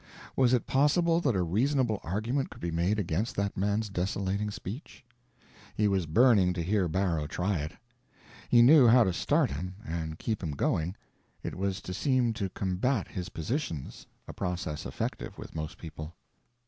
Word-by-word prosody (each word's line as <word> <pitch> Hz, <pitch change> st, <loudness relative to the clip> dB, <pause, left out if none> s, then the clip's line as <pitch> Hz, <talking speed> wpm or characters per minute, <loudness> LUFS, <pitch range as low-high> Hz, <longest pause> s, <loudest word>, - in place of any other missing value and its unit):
Was 130 Hz, -2 st, +4 dB
it 125 Hz, -2 st, +2 dB
possible 165 Hz, +5 st, +3 dB
that 135 Hz, -9 st, +1 dB
a 90 Hz, -, +2 dB
reasonable 115 Hz, -, +1 dB
argument 115 Hz, -, -1 dB
could -, -, -12 dB
be 85 Hz, -, -3 dB
made 85 Hz, +6 st, +1 dB
against 105 Hz, +5 st, -1 dB
that 100 Hz, 0 st, -1 dB
man's 105 Hz, +3 st, 0 dB
desolating 100 Hz, +2 st, -1 dB
speech? 105 Hz, -, -8 dB, 0.7 s
He 105 Hz, -, +2 dB
was 95 Hz, -4 st, +1 dB
burning 100 Hz, 0 st, +5 dB
to 85 Hz, -2 st, -2 dB
hear 95 Hz, +1 st, +1 dB
Barrow 85 Hz, -4 st, 0 dB
try 90 Hz, +3 st, -1 dB
it. 75 Hz, +2 st, -4 dB, 0.8 s
He 120 Hz, -1 st, +7 dB
knew 135 Hz, 0 st, +8 dB
how 120 Hz, +1 st, +7 dB
to 95 Hz, -, 0 dB
start -, -, +2 dB
him, 90 Hz, +7 st, -5 dB
and 80 Hz, -4 st, -4 dB
keep 110 Hz, +2 st, -2 dB
him 80 Hz, -5 st, -3 dB
going: 80 Hz, +5 st, 0 dB, 0.5 s
it -, -, -4 dB
was 100 Hz, 0 st, -2 dB
to 90 Hz, -, -6 dB
seem 125 Hz, +1 st, +1 dB
to 100 Hz, -4 st, -3 dB
combat 100 Hz, +6 st, -1 dB
his 90 Hz, -3 st, -5 dB
positions—a 85 Hz, -, -5 dB
process 85 Hz, -4 st, -3 dB
effective -, -, -4 dB
with -, -, -9 dB
most 80 Hz, +2 st, -5 dB
people. 80 Hz, 0 st, -8 dB
100 Hz, 165 wpm, -29 LUFS, 85-120 Hz, 0.8 s, knew